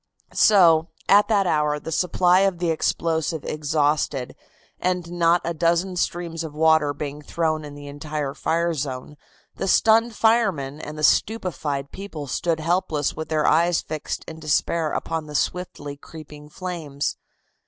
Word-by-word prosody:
So, 170 -6 +5 0.2
at 205 +1 +6
that 205 -3 +2
hour, 150 -3 +1
the 160 - -7
supply 180 +2 +3
of 195 -2 +2
the 170 -1 0
explosive 160 -1 -1
exhausted, 150 -3 0 0.4
and 180 -2 -1
not 170 0 +3
a 170 - -1
dozen 170 +3 +1
streams 170 -2 -2
of 155 -2 -7
water 160 -2 +4
being 145 0 -6
thrown 155 0 -1
in 145 -1 -9
the 145 0 -10
entire 145 0 -4
fire 170 +3 0
zone, 135 -1 -5 0.4
the - - -2
stunned 225 +3 +4
firemen 195 - +1
and 150 +1 -7
the 150 - -5
stupefied 155 -9 0
people 190 -7 -7
stood 160 +4 -1
helpless 160 -3 0
with 160 -1 -6
their 155 -1 +1
eyes 170 +2 +3
fixed 155 -1 -5
in 160 0 -8
despair 155 +1 0
upon 160 -2 -3
the 150 - -8
swiftly 145 -3 -3
creeping 150 -1 -12
flames. 155 -5 -4
160 Hz, 150 wpm, -23 LUFS, 150-175 Hz, 0.4 s, at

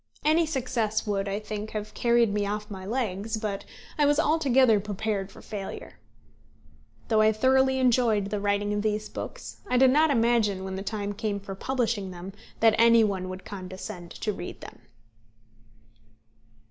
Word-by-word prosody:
Any 320 +2 +4
success 240 -6 -1
would, 200 -1 -1
I 200 +1 -2
think, 210 0 -5
have 215 -1 -5
carried 235 -3 +3
me 205 0 0
off 210 +1 -4
my 190 -1 -7
legs, 220 -2 -2
but 210 -2 -4 0.3
I 295 - +5
was 290 +1 +3
altogether 265 -8 +4
prepared 205 -1 -3
for - - -14
failure. 200 -3 -7 1.1
Though 220 -2 +4
I 215 0 +5
thoroughly 265 +4 +3
enjoyed 235 -6 +2
the 210 - -1
writing 205 0 0
of 205 - 0
these 215 0 -1
books, - - -7
I 250 - +1
did 260 0 +6
not 310 +3 +4
imagine, 230 -6 +2
when 190 0 -4
the 190 - -4
time 205 0 -3
came 210 -1 -2
for 195 0 -7
publishing 230 -2 -1
them, 180 +1 -8 0.3
that 225 -1 +6
any 230 0 +6
one 190 -3 -1
would 185 0 -8
condescend 185 -2 -7
to 210 - -1
read 180 - -7
them. - - -11
215 Hz, 165 wpm, -27 LUFS, 200-240 Hz, 1.1 s, did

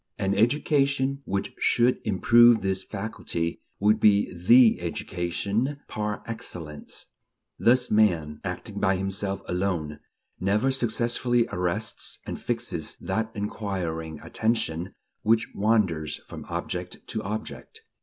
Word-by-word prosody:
An 95 0 0
education 140 +4 +2
which 100 +1 -2
should 120 +1 +3
improve 115 +3 +6
this 95 0 -1
faculty 95 -5 -4 0.2
would 105 +2 +4
be 105 -2 +4
the 110 +3 +6
education 100 - -2
par 105 -1 -3
excellence." 80 -9 -7 0.5
Thus 125 +1 +3
man, 85 -9 +2
acting - - -5
by 95 - +3
himself 95 +1 -2
alone, 90 -5 -2 0.4
never 105 +8 +2
successfully 120 -1 +1
arrests 90 +5 -2
and - - -5
fixes 115 -9 -2
that 110 0 -2
inquiring 90 -7 -3
attention 95 -6 -1 0.3
which 110 +1 +2
wanders 95 -8 +1
from - - -9
object 90 0 -4
to 110 - -2
object. 110 - -6
105 Hz, 110 wpm, -26 LUFS, 90-115 Hz, 0.5 s, improve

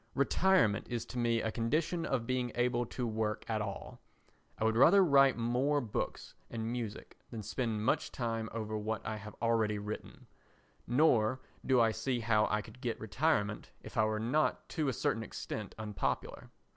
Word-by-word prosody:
Retirement 140 - +3
is 120 -2 -2
to 125 - -5
me 115 -1 +1
a 110 - -1
condition 155 +9 0
of 125 -4 -1
being 125 -1 -1
able 120 -1 +1
to 125 - -3
work 110 -1 -2
at 110 -1 -1
all. 100 -2 -6 0.6
I - - -2
would 110 0 +2
rather 180 - +7
write 140 -4 +5
more 125 +5 +1
books 115 -6 -4 0.2
and 115 0 -3
music 115 -4 -5
than 110 -3 -6
spend 110 -1 -2
much - - +1
time 115 -2 -2
over 110 -1 -4
what 110 0 -3
I 110 -1 -3
have 105 0 -9
already 110 -2 +2
written; 105 +1 -7 0.6
nor 125 -3 +3 0.2
do 130 -2 +3
I 115 -1 +4
see 120 +3 -2
how 110 -1 +3
I 105 0 0
could 115 +3 -14
get 120 -2 -2
retirement 110 -3 0
if - - -10
I 110 - +4
were 110 0 -1
not 125 +8 0
to 155 -2 -1
a 135 - +1
certain 115 - 0
extent 115 - -6
unpopular. 105 -2 -3
115 Hz, 175 wpm, -33 LUFS, 110-125 Hz, 0.6 s, rather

